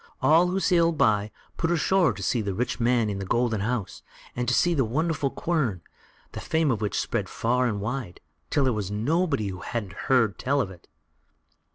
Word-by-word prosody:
All 165 +3 +4
who 185 +2 0
sailed 170 -4 +2
by, 105 -3 +2 0.3
put 165 - 0
ashore 175 +1 +3
to - - -7
see 120 - +1
the 100 -2 -3
rich 125 +4 -2
man 120 -1 +2
in 100 -2 -3
the - - -4
golden 115 0 0
house, 115 -2 -3 0.3
and 125 0 -2
to 130 - +2
see 175 - +3
the 140 -5 +2
wonderful 145 +4 0
quern, 130 - -1 0.5
the - - -7
fame 160 -3 +1
of 110 -4 -2
which 105 - -1
spread - - -2
far 125 +2 +1
and 105 -3 -2
wide, 110 -2 -4 0.3
till 145 - +2
there 130 -2 +2
was 105 -3 -3
nobody 135 - 0
who 95 -1 -6
hadn't 105 -4 -4 0.2
heard 115 -6 +3
tell 140 +2 +1
of 100 -8 -1
it. 90 -3 -15
125 Hz, 200 wpm, -26 LUFS, 105-155 Hz, 0.5 s, All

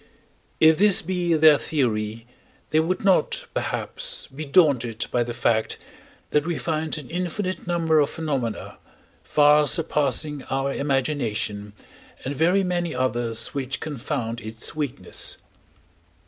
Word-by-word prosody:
If 160 0 +6
this 205 -1 +5
be 175 -1 0
their 155 -2 +6
theory, 115 -5 -1 0.5
they 155 - +4
would 180 +4 -1
not, 190 -2 +2
perhaps, - - -2
be 150 +2 -8
daunted 130 -7 +2
by 120 - +1
the 120 0 -2
fact 115 -1 0 0.5
that 150 - +3
we 170 0 -2
find 160 -1 -2
an 145 -4 -8
infinite 185 +2 -3
number 165 -3 +2
of 145 -1 +2
phenomena, 135 -9 -4 0.4
far 150 0 +4
surpassing 150 -2 +1
our 135 +1 -1
imagination, 125 -7 -1 0.5
and 135 - -2
very 180 +6 +3
many 175 -3 -1
others 120 -3 -1
which 135 -2 -4
confound 115 -5 -4
its 110 +1 -5
weakness. 145 -5 -1
150 Hz, 125 wpm, -24 LUFS, 120-165 Hz, 0.5 s, If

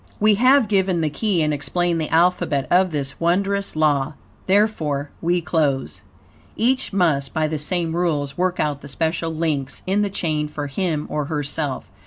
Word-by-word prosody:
We 215 0 +5
have 255 +3 +4
given 190 -4 +1
the 155 -2 0
key 195 -2 0
and 150 0 +1
explained 165 +4 -1
the 155 - -3
alphabet 165 -4 +2
of 185 +1 +4
this 140 -4 -4
wondrous 195 +3 0
law; 150 -3 +2 0.3
therefore 165 -9 +1
we 175 +1 +1
close. 150 -5 -1 0.5
Each 255 +4 +1
must, 165 -8 +1
by 155 -1 +1
the 155 0 -3
same 165 +1 -1
rules, 150 -5 -1
work 180 0 0
out 145 -2 -1
the 140 - -9
special 165 +4 -1
links 155 -4 -2
in 195 +2 +1
the 205 - 0
chain 155 -5 -1
for 150 -1 -5
him 155 +1 -2
or 150 -1 -2
herself. 145 -1 -3
165 Hz, 170 wpm, -22 LUFS, 150-185 Hz, 0.5 s, We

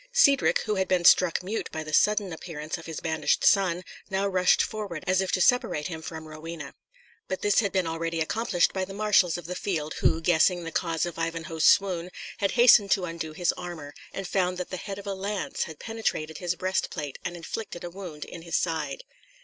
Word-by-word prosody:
Cedric, 280 - +4
who 210 -2 -1
had 190 - +1
been 180 -2 +1
struck 180 0 +5
mute 210 +5 -3
by 155 0 -4
the 155 0 -8
sudden 210 0 +3
appearance 160 -2 -6
of 165 - -11
his 160 - -5
banished 160 -2 0
son, 185 -3 +3 0.3
now 195 +1 0
rushed 185 -2 +3
forward, 205 -7 -5
as 185 +1 +2
if 190 - -2
to 185 - +2
separate 230 - +2
him 160 -2 -6
from 160 -1 -7
Rowena. 155 -1 -8 0.5
But 190 - -4
this 205 -1 +4
had 200 -3 +1
been 190 -2 +1
already 165 0 -2
accomplished 180 +2 +1
by 190 - -1
the 195 +1 -7
marshals 200 -5 +3
of 175 - -9
the 180 - -4
field, 160 -5 -2
who, 160 - +3
guessing 175 +2 +3
the 165 - -5
cause 165 0 0
of 170 -1 -6
Ivanhoe's 165 -1 -2
swoon, 180 -3 +4 0.3
had 200 -1 +1
hastened 235 -4 +7
to 185 - 0
undo 165 -2 -5
his 175 +2 +1
armour, 170 -5 -8 0.2
and 195 -1 -5
found 180 -1 0
that 180 - -5
the 185 - -3
head 195 +2 -6
of 200 - -9
a 200 - -2
lance 195 +1 -3
had 160 -3 -9
penetrated 160 -9 -3
his 180 -1 -1
breast 185 +1 -1
plate 145 -5 -6
and 175 - -4
inflicted 175 +2 -6
a 175 - -6
wound 175 -5 -8
in 170 - -9
his 170 0 -4
side. 155 -5 -1
180 Hz, 215 wpm, -27 LUFS, 165-195 Hz, 0.5 s, hastened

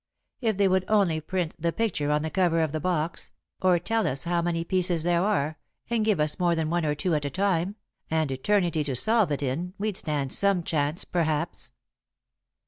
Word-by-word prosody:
If 220 -5 0
they 200 -1 +4
would 185 0 +2
only 190 -7 +2
print 175 +1 -2
the 170 +1 0
picture 195 -9 -1
on 150 0 +1
the 160 - -3
cover 175 -3 +2
of 155 - -1
the 155 - -2
box, 165 -1 -2 0.3
or 185 -1 +4
tell 225 +6 0
us 135 +1 -1
how 170 0 0
many 170 -1 -1
pieces 175 -2 +1
there 175 0 +2
are, 160 -7 0 0.3
and 230 -2 +2
give 215 -6 +2
us 150 +3 +1
more 175 -1 +2
than 160 -1 -1
one 170 -2 0
or 150 - 0
two 175 +3 -1
at 150 -1 0
a - - -1
time, 190 +3 0 0.3
and 160 -3 0
eternity 165 +3 +1
to 135 -3 -2
solve 215 - +3
it 145 0 -1
in, 165 +8 -3
we'd 210 -1 -2
stand 145 -3 -1
some 200 -3 +2
chance, 150 0 -1
perhaps." 160 -4 -2
170 Hz, 205 wpm, -26 LUFS, 155-190 Hz, 0.3 s, they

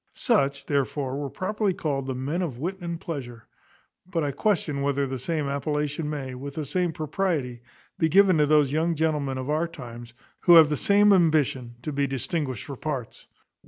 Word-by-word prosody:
Such, 140 - +1
therefore, 140 -1 -1
were 145 -1 -3
properly 200 - -1
called 140 -5 -2
the 130 - -2
men 140 +8 -2
of 150 -9 -3
wit 180 +8 -4
and 170 -1 -4
pleasure; 120 -9 -7 0.6
but 165 -3 -1
I 145 - 0
question 150 -3 0
whether 140 0 +1
the 130 -1 -4
same 155 +2 -2
appellation 150 +2 -2
may, 135 -4 -4
with 140 +2 -7
the 155 - -3
same 180 +4 0
propriety, 155 -6 -2 0.4
be 160 - +3
given 190 -1 +5
to 150 - +4
those 150 -2 +4
young 165 +2 +1
gentlemen 150 -4 0
of 130 0 -4
our 160 +3 +1
times, 120 -6 -10 0.2
who 175 - +6
have 160 -2 +8
the 150 - +1
same 205 +4 +4
ambition 150 -9 +2
to 150 - -3
be 140 0 +1
distinguished 135 -1 -3
for 140 -3 -6
parts. 135 -6 -5
150 Hz, 185 wpm, -26 LUFS, 135-165 Hz, 0.6 s, have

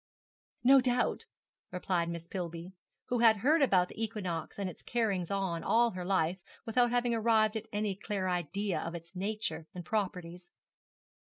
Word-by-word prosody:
'No 265 +2 +7
doubt,' 245 -1 0 0.4
replied 180 -2 -1
Miss 170 0 -6
Pillby, 170 0 -5 0.4
who 245 - +1
had 225 -2 +6
heard 295 +9 +3
about 185 -9 +4
the 225 - -5
equinox 185 -7 -4
and 200 -1 -2
its 180 - -8
carryings 205 -7 -1
on 190 -4 -1
all 230 +3 +3
her 180 -1 -5
life 180 -1 +1 0.3
without 240 +2 +3
having 240 0 +1
arrived 220 -1 +3
at 220 0 -4
any 210 -1 -1
clear 200 -1 -3
idea 180 +2 -1
of 170 +1 -5
its 170 +2 -10
nature 185 -5 -3
and 175 -2 -7
properties. 180 -4 -3
195 Hz, 160 wpm, -31 LUFS, 175-225 Hz, 0.4 s, No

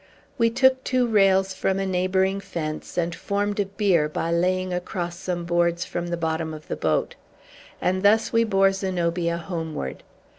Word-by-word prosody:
We 230 0 +4
took 260 +2 +3
two 255 -2 +1
rails 195 -3 +3
from 190 0 0
a 195 - -1
neighboring 190 +1 +1
fence, 160 -6 -5
and 170 -1 0
formed 205 +4 -2
a 200 - +1
bier 195 -6 +2
by 165 +2 -2
laying 185 +2 +1
across 175 -1 -3
some 175 -2 -3
boards 170 0 +1
from 175 0 -4
the 170 0 -2
bottom 160 -1 -2
of 155 - -12
the - - -3
boat. - - 0 0.7
And 185 +1 0
thus 215 +4 +3
we 230 0 +4
bore 195 -3 +3
Zenobia 175 -3 -1
homeward. 160 - -5
185 Hz, 170 wpm, -24 LUFS, 170-195 Hz, 0.7 s, We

